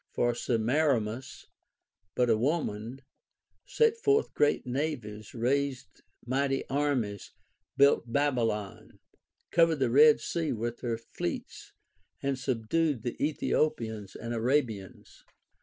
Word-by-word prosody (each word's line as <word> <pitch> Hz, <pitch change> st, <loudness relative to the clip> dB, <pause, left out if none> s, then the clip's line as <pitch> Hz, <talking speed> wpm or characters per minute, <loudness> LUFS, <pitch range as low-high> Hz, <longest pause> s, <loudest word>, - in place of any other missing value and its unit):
For 120 Hz, 0 st, +1 dB
Semiramis, 120 Hz, 0 st, 0 dB, 0.7 s
but 125 Hz, -, +2 dB
a 115 Hz, -, +4 dB
Avoman, 125 Hz, -2 st, -2 dB, 0.7 s
set 455 Hz, 0 st, +2 dB
forth 430 Hz, 0 st, +2 dB
great 145 Hz, -1 st, +2 dB
navies, 125 Hz, -6 st, -4 dB
raised 130 Hz, -3 st, -1 dB, 0.2 s
mighty 135 Hz, +2 st, 0 dB
armies, 135 Hz, -8 st, -1 dB, 0.4 s
built 140 Hz, -4 st, +4 dB
Babylon, 115 Hz, -8 st, -1 dB, 0.5 s
covered 165 Hz, -1 st, +4 dB
the 130 Hz, -4 st, 0 dB
E,ed 150 Hz, +1 st, +7 dB
Sea 165 Hz, -2 st, -2 dB
with 120 Hz, +1 st, -4 dB
her 115 Hz, -2 st, -2 dB
fleets 110 Hz, -6 st, -6 dB, 0.5 s
and 135 Hz, -1 st, -2 dB
subdued 130 Hz, +2 st, 0 dB
the 120 Hz, -, -3 dB
Ethiopians 120 Hz, -8 st, -1 dB
and 120 Hz, +1 st, -5 dB
Arabians. 110 Hz, -5 st, -2 dB
125 Hz, 105 wpm, -29 LUFS, 115-145 Hz, 0.7 s, E,ed